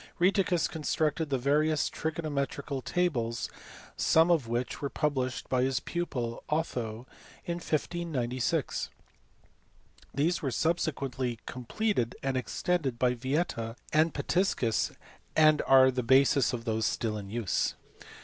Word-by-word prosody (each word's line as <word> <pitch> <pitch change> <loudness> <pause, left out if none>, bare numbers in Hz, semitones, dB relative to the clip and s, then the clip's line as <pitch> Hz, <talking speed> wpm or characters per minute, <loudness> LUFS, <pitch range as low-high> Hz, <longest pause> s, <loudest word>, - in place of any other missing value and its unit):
Rheticus 180 -1 +3
constructed 155 0 -1
various 145 +3 +2
trigonometrical 145 -3 -3
tables 120 -10 -1 0.4
some 165 +2 +4
of 155 -9 +2
which 120 +2 -2
were 140 - -1
published 130 -5 -1
by 130 -1 +1
his 130 0 +1
pupil 125 -9 -3
Otho 120 -7 -2 0.4
in 170 -2 -2
1596. 150 -7 -1 1.2
These 165 +5 +1
were 140 - -1
subsequently 135 -4 -1
completed 125 - -1
and 135 -1 0
extended 135 +1 -1
by 125 0 +2
Yieta 125 -3 -2 0.2
and 155 +2 +4
Pitiscus, 140 - 0 0.4
and 155 -1 +5
are 130 -1 +7
the 125 0 -1
basis 135 +3 +4
of 120 -2 -5
those 110 -1 +1
still 110 -2 -1
in 100 -2 -6
use. 110 -3 0
135 Hz, 115 wpm, -29 LUFS, 120-160 Hz, 1.2 s, are